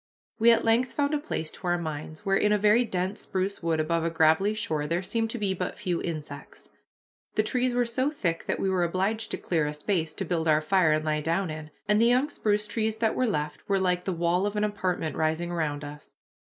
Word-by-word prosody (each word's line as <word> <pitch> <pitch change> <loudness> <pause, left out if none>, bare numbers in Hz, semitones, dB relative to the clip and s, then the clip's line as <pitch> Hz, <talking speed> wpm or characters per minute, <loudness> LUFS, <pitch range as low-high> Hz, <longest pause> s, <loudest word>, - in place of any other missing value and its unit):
We 230 +1 +6
at 230 - +4
length 235 +3 +2
found 285 +1 0
a 300 - +1
place 160 - -4
to 185 - -8
our 175 0 +2
minds, 155 -1 -6
where, 195 0 +2
in 210 +1 +3
a 210 - +4
very 210 +4 +4
dense 185 -1 -2
spruce 190 +1 -2
wood 165 -2 0
above 165 +1 0
a 165 - +1
gravelly 160 +6 +3
shore, 155 -8 -2
there 170 +4 -1
seemed 225 +4 -1
to 240 - -3
be 200 -3 0
but 185 - -4
few 180 -3 -2
insects. 155 -3 -6 0.6
The 215 - +3
trees 250 +2 0
were 245 0 +2
so 255 +4 0
thick 175 - -2
that - - -1
we - - 0
were 185 -2 +1
obliged 195 +6 -1
to - - -3
clear 160 -4 0
a 150 - -3
space 160 0 -1
to - - -3
build 165 -2 -1
our 155 -1 +5
fire 160 +1 +3
and 155 0 0
lie 155 -1 0
down 165 +3 0
in, 155 0 -7 0.2
and 210 +1 +3
the 230 - +5
young 255 +5 +3
spruce 210 -4 0
trees 220 0 -1
that 225 0 +1
were 255 - +1
left 150 -6 -3
were 195 -1 +3
like 180 -1 0
the 190 - 0
wall 175 +3 +1
of 205 - -4
an 210 - +1
apartment 185 -6 -1
rising 160 +2 0
around 150 -4 -2
us. 145 0 -9
185 Hz, 240 wpm, -27 LUFS, 160-215 Hz, 0.6 s, We